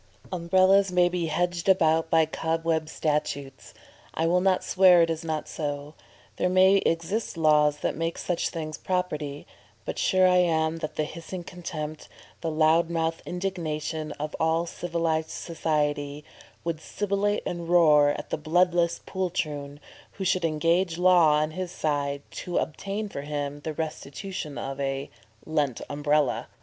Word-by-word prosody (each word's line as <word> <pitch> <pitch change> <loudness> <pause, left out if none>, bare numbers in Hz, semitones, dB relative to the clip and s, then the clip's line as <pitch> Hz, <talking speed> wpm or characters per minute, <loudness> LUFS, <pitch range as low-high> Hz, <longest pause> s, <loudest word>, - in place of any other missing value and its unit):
Umbrellas 185 +3 +4
may 180 -1 +4
be 175 -2 -2
'hedged 175 +3 -1
about' 165 -3 +3
by 160 -1 +4
cobweb 160 0 -1
statutes; 145 -3 -3 0.4
I 160 - +1
will 180 +2 +3
not 190 -1 +2
swear 185 -2 +6
it 165 - +1
is 160 +1 -4
not 155 -2 -3
so; 145 -1 -4 0.4
there 180 - +1
may 190 +2 +5
exist 185 +3 -1
laws 150 -2 +3
that - - -1
make 165 +1 -2
such 175 -2 -1
things 155 -2 -5
property; 150 -6 -3 0.4
but - - -4
sure 185 0 +4
I 180 0 +4
am 160 -2 +2
that 155 -2 -5
the 155 - 0
hissing 170 +3 -7
contempt, 155 -4 -6 0.3
the 165 - -1
loud 160 +2 +3
mouthed 165 -1 -1
indignation 160 -4 -3
of 150 +1 -5
all 160 +1 +2
civilised 165 -2 -2
society, 150 -3 -2 0.4
'would 165 -2 -3
sibilate 205 +2 -1
and 170 -1 -4
roar 155 -4 +6
at 145 - -4
the - - -1
bloodless 170 +2 +2
poltroon 150 -6 -3 0.3
who 195 - -5
should 185 -1 +1
engage 165 +2 +1
law 175 -4 +5
on 155 +1 +1
his 185 +2 -4
side 145 -3 -2 0.2
to 175 - -3
obtain 200 +7 -3
for 170 - -6
him 145 0 -4
the 155 +1 -5
restitution 155 +1 -5
of 135 +1 -5
a 135 0 -3 0.3
lent 145 -6 0
Umbrella!" 145 -2 +1
165 Hz, 150 wpm, -26 LUFS, 150-180 Hz, 0.4 s, swear